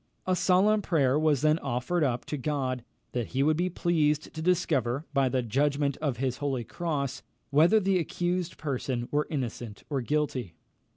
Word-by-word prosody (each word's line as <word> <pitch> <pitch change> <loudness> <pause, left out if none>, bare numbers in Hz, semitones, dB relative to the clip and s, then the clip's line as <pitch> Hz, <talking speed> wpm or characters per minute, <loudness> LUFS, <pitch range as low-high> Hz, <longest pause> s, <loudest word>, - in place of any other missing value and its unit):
A 185 - +2
solemn 195 +4 +3
prayer 145 -7 +2
was 155 -4 +2
then 155 +1 +4
offered 135 +6 -1
up 125 -4 0
to - - -3
God, 130 -3 -2 0.3
that 120 -3 -2
he 135 - +4
would 155 +2 +3
be 175 +3 0
pleased 155 -4 0
to 160 - -5
discover, 155 -6 +1
by 135 -2 +3
the 125 0 0
judgment 140 +4 +1
of 145 -6 -2
his 130 0 -1
holy 135 -4 -2
cross, 140 -1 -3 0.3
whether 165 +10 +5
the 195 -2 +2
accused 175 +1 -2
person 130 -4 -2
were 150 +1 +1
innocent 120 -7 -4
or 140 -2 0
guilty. 130 - -1
145 Hz, 170 wpm, -28 LUFS, 130-165 Hz, 0.3 s, whether